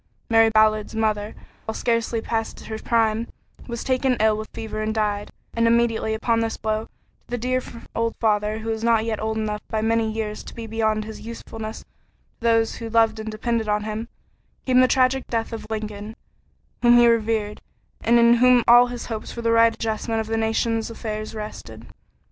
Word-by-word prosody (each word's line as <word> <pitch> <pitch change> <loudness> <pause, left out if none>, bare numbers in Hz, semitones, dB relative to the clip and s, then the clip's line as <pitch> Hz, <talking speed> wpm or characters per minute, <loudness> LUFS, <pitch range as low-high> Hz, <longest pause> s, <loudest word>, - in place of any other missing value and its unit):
Mary 225 0 +6
Ballard's 215 0 +2
mother, 215 -1 -1 0.3
while 220 - -4
scarcely 230 -1 0
past 225 0 -3
her 220 0 -5
prime, 225 0 +1 0.4
was 235 -2 -5
taken 260 -1 +1
ill 215 0 +4
with 215 0 -6
fever 215 -1 -5
and 215 +1 -2
died, 205 -1 -1 0.2
and 230 0 +2
immediately 230 -1 +2
upon 230 +1 +1
this 225 0 -1
blow 215 0 -2
to - - -24 0.4
the 245 - -3
dear 255 +2 0 0.3
old 230 0 0
father 210 -1 +1
who 220 +1 -5
was 220 0 -2
not 230 -1 +3
yet 220 -2 -2
old 220 0 -2
enough 210 -1 -2
by 220 - -2
many 225 0 +1
years 215 -1 -4
to - - -11
be 230 - -6
beyond 220 -1 0
his 220 0 -9
usefulness 225 -1 -7
to - - -20 0.5
those 225 -1 +2
who 230 -1 -6
loved 225 -1 +3
and 220 0 -5
depended 225 0 -2
on 210 0 +1
him, 215 +2 -4 0.6
came 255 -1 +4
the 255 - +6
tragic 260 0 +2
death 230 0 -2
of 225 - -6
Lincoln, 215 0 -5 0.7
whom 240 0 +6
he 240 0 +7
revered 220 -2 +1 0.4
and 235 +1 +4
in 235 0 +6
whom 250 0 +5
all 240 +1 +8
his 245 -1 -6
hopes 220 -2 -5
for 235 - -7
the 230 - +2
right 230 0 +5
adjustment 225 0 -2
of 220 - -2
the 225 +1 -2
nation's 225 0 0
affairs 215 -1 -5
rested. 115 - -8
225 Hz, 190 wpm, -23 LUFS, 215-230 Hz, 0.7 s, all